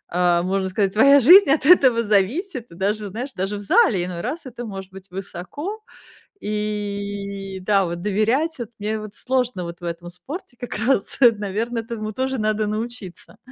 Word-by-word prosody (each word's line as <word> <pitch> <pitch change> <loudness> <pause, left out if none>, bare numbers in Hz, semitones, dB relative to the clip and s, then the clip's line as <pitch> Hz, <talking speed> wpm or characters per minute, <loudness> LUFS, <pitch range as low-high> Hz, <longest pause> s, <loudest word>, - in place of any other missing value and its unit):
а, 175 -1 +3
можно 190 +1 -1
сказать, 195 0 0
твоя 275 +6 +6
жизнь 360 - +8
от 280 -1 +2
этого 260 -8 +6
зависит, 230 - 0
и - - -12
даже, 205 +3 -1
знаешь, 245 +8 -5
даже 195 +3 -2
в - - -6
зале, 195 -2 +3
иной 175 -1 -5
раз 295 +7 -4
это 245 -2 -7
может 195 -3 -8
быть 190 0 -13
высоко. 195 - -6 0.6
И 200 -2 -4
да, 195 -1 +3
вот, 170 0 -5
доверять, 225 - 0
вот 235 -3 -6
мне 215 +1 -2
вот 215 -1 -9
сложно, 250 -7 -1
вот, 170 +1 -8
в 175 - -11
этом 170 0 -5
спорте, 245 - -9
как 245 - -6
раз, 220 -1 0 0.2
наверно, 215 +4 -3
этому 220 -1 -5
тоже 265 +3 -2
надо 215 0 0
научиться. 215 -3 -6
210 Hz, 175 wpm, -22 LUFS, 195-245 Hz, 0.6 s, жизнь